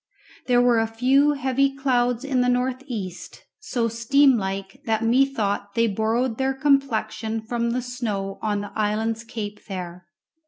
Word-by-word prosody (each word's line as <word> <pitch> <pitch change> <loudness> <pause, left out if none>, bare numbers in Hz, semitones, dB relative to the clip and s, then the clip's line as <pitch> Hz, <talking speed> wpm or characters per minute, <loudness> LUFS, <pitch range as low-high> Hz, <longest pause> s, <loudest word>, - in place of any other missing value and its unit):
There 245 -1 +4
were 240 -2 +4
a 225 - +1
few 265 +6 +3
heavy 275 0 +1
clouds 250 -3 +1
in 265 -3 +1
the 250 - +2
north 250 +1 0
east, 185 -8 -6 0.2
so 240 - -1
steam 255 +4 +4
like 195 -2 -4
that 225 0 0
methought 225 -5 +1
they 230 0 +3
borrowed 225 +3 0
their 265 0 0
complexion 240 -5 0
from 235 +1 -2
the 245 +1 -1
snow 210 -6 -4
on 205 -2 -1
the 205 - -7
island's 220 +1 -1
cape 210 -3 -6
there. 180 -3 -7
230 Hz, 155 wpm, -24 LUFS, 215-255 Hz, 0.2 s, There